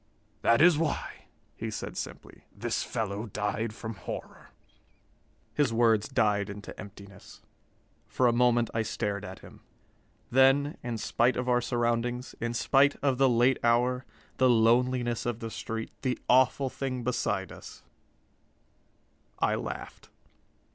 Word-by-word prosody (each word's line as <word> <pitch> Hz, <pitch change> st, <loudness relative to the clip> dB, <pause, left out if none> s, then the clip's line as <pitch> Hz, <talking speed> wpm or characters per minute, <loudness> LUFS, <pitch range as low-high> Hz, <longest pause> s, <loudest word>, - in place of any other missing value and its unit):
"That 115 Hz, +6 st, +4 dB
is 170 Hz, -3 st, +6 dB
why," 160 Hz, -3 st, -3 dB, 0.3 s
he -, -, -5 dB
said -, -, -6 dB
simply, -, -, -8 dB
"this -, -, -1 dB
fellow 105 Hz, 0 st, -3 dB
died 105 Hz, +2 st, -2 dB
from 110 Hz, +1 st, -7 dB
horror." 95 Hz, -, -8 dB, 1.0 s
His 145 Hz, -5 st, +2 dB
words 115 Hz, -2 st, +3 dB
died 105 Hz, -2 st, +1 dB
into 100 Hz, 0 st, -8 dB
emptiness. 100 Hz, -1 st, -12 dB, 0.6 s
For 130 Hz, -, 0 dB
a 120 Hz, -, +4 dB
moment 120 Hz, -1 st, +3 dB
I 115 Hz, -, +1 dB
stared 105 Hz, -2 st, -3 dB
at 95 Hz, -2 st, -8 dB
him. -, -, -14 dB, 0.7 s
Then, 135 Hz, +3 st, +4 dB
in 120 Hz, -2 st, -4 dB
spite 120 Hz, +3 st, +1 dB
of 125 Hz, 0 st, -2 dB
our 125 Hz, -1 st, +3 dB
surroundings, 120 Hz, +1 st, -1 dB
in 115 Hz, +1 st, -2 dB
spite 140 Hz, +3 st, +3 dB
of 135 Hz, -3 st, +1 dB
the 135 Hz, -1 st, +5 dB
late 120 Hz, +2 st, +3 dB
hour, 125 Hz, +2 st, +2 dB, 0.3 s
the 130 Hz, -1 st, +4 dB
loneliness 120 Hz, +1 st, +2 dB
of 120 Hz, -2 st, -2 dB
the 115 Hz, -1 st, -6 dB
street, 110 Hz, +2 st, -5 dB
the 125 Hz, -1 st, -1 dB
awful 130 Hz, +1 st, +3 dB
thing 130 Hz, -3 st, -4 dB
beside 105 Hz, -6 st, -1 dB
us, -, -, -12 dB, 1.5 s
I -, -, +1 dB
laughed. -, -, -6 dB
120 Hz, 135 wpm, -29 LUFS, 110-125 Hz, 1.5 s, is